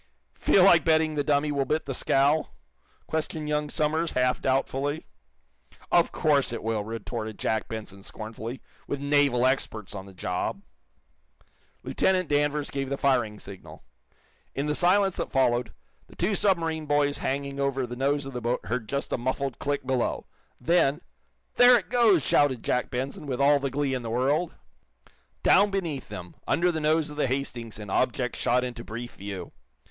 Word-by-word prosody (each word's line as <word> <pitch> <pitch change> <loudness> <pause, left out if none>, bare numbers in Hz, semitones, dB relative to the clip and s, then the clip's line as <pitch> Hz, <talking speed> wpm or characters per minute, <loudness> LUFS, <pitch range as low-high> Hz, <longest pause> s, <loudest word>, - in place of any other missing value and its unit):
"Feel 190 - +4
like 175 -4 +6
betting 160 -1 +3
the 145 -1 0
dummy 145 +1 +1
will 140 -1 +1
bit 155 +4 -1
the 135 - -3
scow?" 140 +4 +2 0.6
questioned 155 -1 -3
young 150 0 -1
Somers, 155 +3 0
half 125 0 +1
doubtfully. 135 +3 -1 0.9
"Of 170 -1 +4
course 145 -6 +2
it 120 - -5
will," 110 -2 -1
retorted 110 0 -5
Jack 110 -1 -1
Benson, 105 -3 -7
scornfully, 110 +4 -7 0.2
"with 145 - -3
naval 140 -3 +3
experts 110 -6 -1
on 95 -1 -7
the 95 - -13
job!" 90 - -3 1.2
Lieutenant 185 -3 +1
Danvers 145 0 +1
gave 135 -1 -3
the 140 - -2
firing 120 -7 +1
signal. 95 -1 -11 0.7
In 140 - -1
the 150 - 0
silence 185 +3 +3
that - - -3
followed, 120 -4 +2 0.4
the - - -17
two 185 +5 0
submarine 165 -6 +1
boys 145 -1 +2
hanging 140 +1 -3
over 135 -1 0
the 120 0 -7
nose 140 +2 0
of 135 - -7
the 125 - -4
boat 120 +1 -1
heard 115 -2 -3
just 140 0 -2
a - - 0
muffled 130 +1 -2
click 145 -1 -2
below. 130 -2 -1 0.3
Then 165 -3 +2 0.6
"There 245 0 +8
it 215 - -6
goes!" 225 - +4
shouted 135 -5 +2
Jack 125 - 0
Benson, 135 +4 -4
with 130 -2 -3
all 140 +1 +5
the 140 0 -2
glee 140 0 -1
in 130 - -2
the 115 - -5
world. 140 +9 0 0.9
Down 205 +1 +5
beneath 175 -8 -3
them, 90 -1 -9
under 180 +1 +2
the 160 -2 -3
nose 155 0 +1
of 150 - -10
the 150 - +1
"Hastings" 120 -4 -3
an 105 -2 -8
object 125 +1 0
shot 125 +1 +1
into 120 -2 -5
brief 120 +2 -7
view. 95 -3 -7
140 Hz, 170 wpm, -27 LUFS, 120-150 Hz, 1.2 s, There